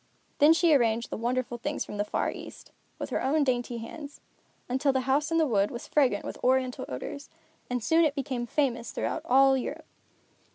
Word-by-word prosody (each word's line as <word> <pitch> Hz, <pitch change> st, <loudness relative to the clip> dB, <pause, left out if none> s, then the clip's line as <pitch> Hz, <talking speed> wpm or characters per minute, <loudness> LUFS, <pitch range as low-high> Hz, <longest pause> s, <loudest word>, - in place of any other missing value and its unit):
Then 295 Hz, +1 st, +7 dB
she 330 Hz, 0 st, +4 dB
arranged 235 Hz, -3 st, +2 dB
the -, -, -2 dB
wonderful 240 Hz, +1 st, -2 dB
things 295 Hz, +5 st, -3 dB
from 210 Hz, -, -7 dB
the 205 Hz, -, +1 dB
Far 210 Hz, -, -1 dB
East, -, -, -11 dB, 0.3 s
with -, -, -6 dB
her -, -, 0 dB
own 290 Hz, +3 st, +2 dB
dainty 245 Hz, -2 st, -1 dB
hands, 285 Hz, +6 st, -9 dB, 0.5 s
until 265 Hz, +3 st, +1 dB
the 265 Hz, -1 st, 0 dB
House 275 Hz, +4 st, +1 dB
in 330 Hz, -, +2 dB
the 320 Hz, -, +4 dB
Wood 205 Hz, -7 st, +2 dB
was 235 Hz, -, -7 dB
fragrant 255 Hz, -9 st, +2 dB
with -, -, -7 dB
Oriental 255 Hz, 0 st, +1 dB
odors, 205 Hz, -, -6 dB, 0.4 s
and 245 Hz, -2 st, -2 dB
soon 325 Hz, +6 st, +4 dB
it 295 Hz, -2 st, +1 dB
became 265 Hz, -4 st, -3 dB
famous 240 Hz, -4 st, -1 dB
throughout -, -, -2 dB
all 270 Hz, +1 st, +5 dB
Europe. 260 Hz, -, -4 dB
260 Hz, 195 wpm, -28 LUFS, 240-290 Hz, 0.5 s, Then